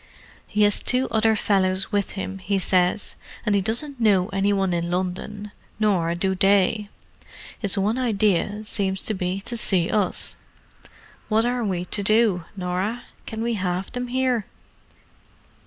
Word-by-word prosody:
"He 210 0 +1
has 205 -1 +4
two 255 +1 +2
other 220 -1 +3
fellows 190 -2 +1
with 205 -2 0
him, 195 -1 -5
he 195 +2 -1
says; 185 +1 +2 0.3
and 210 - +2
he 200 - +3
doesn't 245 +7 -1
know 200 -5 +3
any 195 +1 +1
one 195 -2 +1
in 170 0 -1
London, 190 +3 -3 0.3
nor 180 -6 +2
do 190 +2 0
they. 200 +2 +2 0.7
His 205 -2 +1
one 210 +5 +1
idea 210 -3 +1
seems 195 -3 -2
to 220 - -2
be 185 0 -2
to 235 +4 -5
see 190 -7 +1
us. 205 -3 0 0.9
What 220 +1 +3
are 245 0 0
we 180 -4 -2
to 205 - -1
do, 210 -4 +3
Norah? 185 +6 -2 0.2
Can 220 0 -4
we 235 0 0
have 185 -2 -2
them 250 0 -3
here?" 250 -3 0
200 Hz, 155 wpm, -23 LUFS, 185-220 Hz, 0.9 s, has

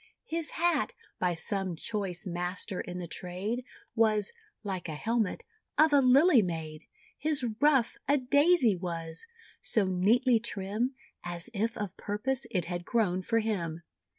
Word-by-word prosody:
His 330 -5 +1
hat, 330 -8 +2 0.3
by 180 -1 +1
some 190 +1 -1
choice 195 +1 -3
master 180 +1 -3
in 180 0 -6
the 175 -1 -5
trade, 190 +9 -4 0.3
Was 220 - +2 0.3
(like 190 -4 -4
a 155 - -4
helmet) 220 +4 -1 0.3
of 310 -1 +5
a 285 - +6
Lily 270 +2 +6
made. 160 -4 -5 0.3
His 295 -3 +1
ruff, 285 -5 +3
a 285 +2 +4
Daisy 285 - +4
was, 165 - -6 0.3
so 215 -3 +3
neatly 225 +7 +3
trim, 215 +4 -2 0.3
As 175 +5 -3
if 225 +2 -1
of 205 -2 -4
purpose 250 +6 -2
it 180 -4 -1
had 175 0 -4
grown 185 -3 +1
for 230 +4 0
him. 170 -7 -3
210 Hz, 145 wpm, -30 LUFS, 180-250 Hz, 0.3 s, a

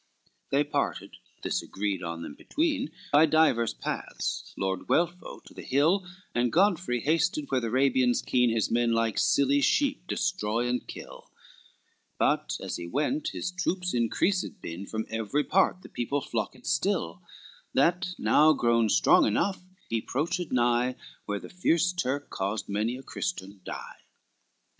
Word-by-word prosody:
XLV - - -41
They 140 +2 +3
parted, 150 - -3 0.3
this - - 0
agreed 100 -2 -3
on 85 -1 -5
them 75 - -7
between, 290 - -1 0.2
By 155 +3 +7
divers 155 -7 +3
paths, - - -4
Lord 95 -1 -2
Guelpho 175 +2 0
to - - -14
the - - -9
hill, 165 +8 +2 0.3
And 120 0 +1
Godfrey 175 - +2
hasted 155 0 0
where 130 -1 +2
the 115 - -2
Arabians 130 0 +2
keen 125 -1 +3
His 115 -2 0
men 120 0 +2
like 115 -1 +1
silly 140 +1 +3
sheep 275 - +1
destroy 120 - -1
and 125 0 -2
kill; - - -10 0.9
But - - +1
as - - -3
he 85 - -6
went 265 - -1
his 180 - -3
troops 180 0 -2
increased 150 - 0
been, 85 +4 -7
From 110 0 -3
every 115 +6 -1
part 185 +1 +2
the - - -10
people 120 +4 -2
flocked - - -4
still, - - 0 0.5
That 175 +5 +2
now 155 +1 +5
grown 115 -4 +2
strong - - +5
enough, 190 - 0 0.3
he 115 -1 -1
'proached 165 +8 -2
nigh 120 0 +2 0.3
Where 105 -1 -2
the - - -10
fierce 180 0 +1
Turk 145 -4 -2
caused 100 +3 -2
many 110 +5 -1
a 135 - -11
Christian 100 - -5
die. - - -8
130 Hz, 150 wpm, -28 LUFS, 115-175 Hz, 0.9 s, By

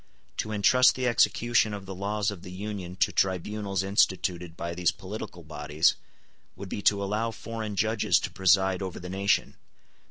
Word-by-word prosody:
To 110 - -2
entrust 110 +5 +5
the 130 - -2
execution 115 -2 +2
of 100 -1 -8
the 95 - -6
laws 105 +2 -1
of 95 -4 -9
the 90 - -10
Union 95 -2 -6
to - - +2
tribunals 95 +1 -1
instituted 90 -3 0
by 85 0 -4
these 90 -1 +1
political - - -7
bodies 75 +2 +1 0.6
would 100 - -8
be 100 - -4
to 100 0 +3
allow 105 +3 -1
foreign 110 -1 -6
judges 105 -2 +2
to - - -4
preside 95 0 +3
over 95 -2 -5
the 90 - -8
nation. 100 +2 0
100 Hz, 165 wpm, -27 LUFS, 90-105 Hz, 0.6 s, entrust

